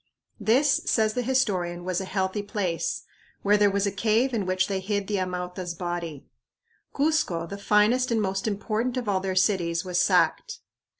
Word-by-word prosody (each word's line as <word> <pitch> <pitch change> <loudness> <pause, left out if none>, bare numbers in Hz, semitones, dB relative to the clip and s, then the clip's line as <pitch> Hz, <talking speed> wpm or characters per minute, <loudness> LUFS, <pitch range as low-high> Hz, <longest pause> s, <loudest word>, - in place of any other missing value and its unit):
This, 270 +6 +3
says 220 -1 +2
the 250 - -1
historian, 190 -9 0
was 185 0 -1
"a - - -4
healthy 190 +1 -1
place" 205 - -2 0.4
where 205 +1 +4
there 205 -1 +4
was 200 0 0
a 200 - 0
cave 225 +5 +1
in 205 -5 -1
which 185 0 +1
they 195 -1 -1
hid 200 +1 -2
the 205 0 -1
Amauta's 180 -1 -4
body. 170 -4 -5 0.7
Cuzco, 290 - 0
the 200 +3 -7
finest 215 +5 +3
and 230 -2 +1
most 195 0 -1
important 220 +4 -1
of 245 -3 -3
all 195 -2 +1
their 190 0 -3
cities, 180 -3 +1
was 180 -1 +1
sacked. 460 - +2
200 Hz, 175 wpm, -26 LUFS, 185-220 Hz, 0.7 s, where